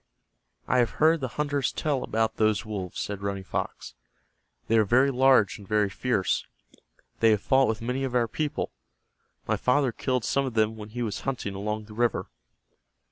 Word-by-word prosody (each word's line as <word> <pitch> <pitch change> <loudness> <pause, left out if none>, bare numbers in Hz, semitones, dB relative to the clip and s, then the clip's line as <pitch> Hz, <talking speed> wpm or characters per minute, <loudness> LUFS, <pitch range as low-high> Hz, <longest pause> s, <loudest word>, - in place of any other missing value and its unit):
"I 125 - +3
have 120 -2 0
heard 160 +2 +4
the 130 - -1
hunters 145 -2 0
tell 145 -4 -1
about 110 0 -1
those 110 0 +2
wolves," 100 -5 -5
said 100 -1 -4
Running 100 -1 -3
Fox. 95 - -4 0.7
"They 115 0 +4
are - - +5
very 130 +7 +3
large 130 -6 +4
and 100 - -13
very 105 -1 +1
fierce. 105 -2 0 0.8
They 115 - +5
have 105 -2 +3
fought 135 0 +4
with 110 0 -2
many 125 +3 -2
of 130 -2 -2
our 120 -2 +3
people. 150 +6 -3 0.8
My - - +1
father 130 0 +2
killed 125 0 -1
some 140 - +1
of 125 - -6
them 110 0 +2
when 105 -1 -9
he 120 +2 -4
was 105 -3 -3
hunting 130 -7 -3
along 105 +2 -3
the 105 - -12
river." 120 +1 0
115 Hz, 185 wpm, -27 LUFS, 105-130 Hz, 0.8 s, are